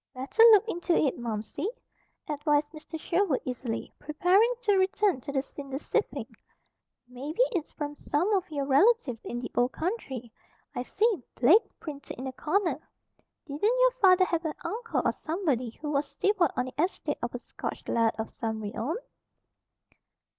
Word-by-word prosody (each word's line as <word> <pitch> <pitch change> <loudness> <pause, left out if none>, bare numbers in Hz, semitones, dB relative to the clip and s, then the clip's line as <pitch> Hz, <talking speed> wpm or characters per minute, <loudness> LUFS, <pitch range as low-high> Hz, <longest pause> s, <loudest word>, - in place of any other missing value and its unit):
"Better 265 - 0
look 430 +1 +6
into 345 -4 0
it, 275 -5 +1
Momsey," 225 - -3 0.6
advised 295 0 +1
Mr. 315 +1 -8
Sherwood 340 -4 +1
easily, 245 -2 -4
preparing 365 +10 +3
to 410 -4 +3
return 380 -5 +2
to 280 - -6
the 270 -1 0
cinder 275 -1 -7
sifting. 295 - -1 0.8
"Maybe 280 - -1
it's 335 -5 -2
from 295 -1 -4
some 345 +9 0
of 375 -2 0
your 285 -3 -2
relatives 285 - +3
in 240 - -4
the 245 - -6
Old 245 +1 +2
Country. 270 - -4 0.4
I - - -2
see 420 - +1
'Blake' 320 - +4
printed 290 -3 -8
in 255 - -6
the 265 - -3
corner. 340 +7 0 0.7
Didn't 415 - 0
your - - +6
father 370 -1 +6
have 335 -2 -1
an 315 -2 -3
uncle 460 +1 -2
or - - +4
somebody, 310 - -1
who 295 +6 -6
was 285 0 0
steward 375 0 +2
on 250 - 0
the 255 +4 -1
estate 365 - -2
of - - -3
a - - -1
Scotch - - -7
Laird 230 -1 +2
of 220 0 -4
some 220 -1 -3
renown?" 220 +8 -3
300 Hz, 160 wpm, -28 LUFS, 255-375 Hz, 0.8 s, look